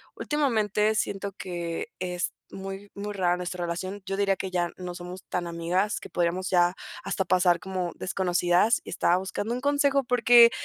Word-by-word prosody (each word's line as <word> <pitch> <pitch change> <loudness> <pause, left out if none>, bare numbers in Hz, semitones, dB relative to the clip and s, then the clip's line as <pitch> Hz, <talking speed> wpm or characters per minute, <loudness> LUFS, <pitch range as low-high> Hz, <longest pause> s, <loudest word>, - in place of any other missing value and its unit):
últimamente 220 -7 +1
siento 200 -1 -1
que 175 -3 -4
es 180 -1 -2 0.2
muy 195 +1 -7
muy 205 +1 -4
rara 180 -2 +1
nuestra 180 0 -3
relación. 185 +4 -4
Yo 195 0 -2
diría 195 -1 +2
que 190 - -3
ya 175 -1 0
no 180 -1 -6
somos 180 +1 -8
tan 175 -1 -1
amigas, 170 +4 0
que - - -10
podríamos 175 +2 0
ya 175 0 +4 0.3
hasta 190 - -1
pasar 180 -1 +4
como 185 0 -3
desconocidas 180 +3 +2
y - - -10
estaba 175 +1 +3
buscando 205 +4 -3
un 250 - -4
consejo, 285 -1 +3
porque, 240 -1 +7
185 Hz, 170 wpm, -27 LUFS, 175-210 Hz, 0.3 s, porque